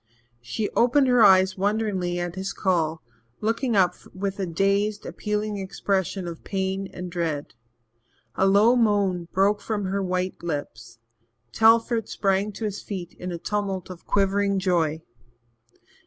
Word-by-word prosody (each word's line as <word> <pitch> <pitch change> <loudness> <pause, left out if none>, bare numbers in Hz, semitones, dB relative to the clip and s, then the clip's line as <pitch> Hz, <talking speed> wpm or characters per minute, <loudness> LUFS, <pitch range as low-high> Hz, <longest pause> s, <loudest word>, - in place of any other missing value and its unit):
She 120 - -3
opened 260 +3 +3
her 245 -2 +5
eyes 190 -1 +5
wonderingly 200 -3 0
at 175 -1 -3
his 190 +1 -4
call, 165 -4 0 0.4
looking 230 +2 0
up 180 -2 +4 0.2
with 195 +1 -3
a 190 - -1
dazed, 200 +4 0
appealing 210 -1 -3
expression 190 -1 -2
of 170 -2 -8
pain 190 0 -2
and 180 -1 -7
dread. 160 -4 -3 0.8
A 195 - +2
low 210 +5 +5
moan 200 -7 +1
broke 200 +2 +2
from 210 -3 -2
her 195 +1 -1
white 185 0 -2
lips. 145 -9 -5 0.5
Telford 225 0 +3
sprang 195 +1 0
to 220 - -5
his 205 -1 -4
feet 185 -4 -6
in 180 0 -5
a 170 - -4
tumult 195 0 -3
of 175 - -12
quivering 200 0 +2
joy. 165 -4 0
195 Hz, 140 wpm, -25 LUFS, 180-210 Hz, 0.8 s, her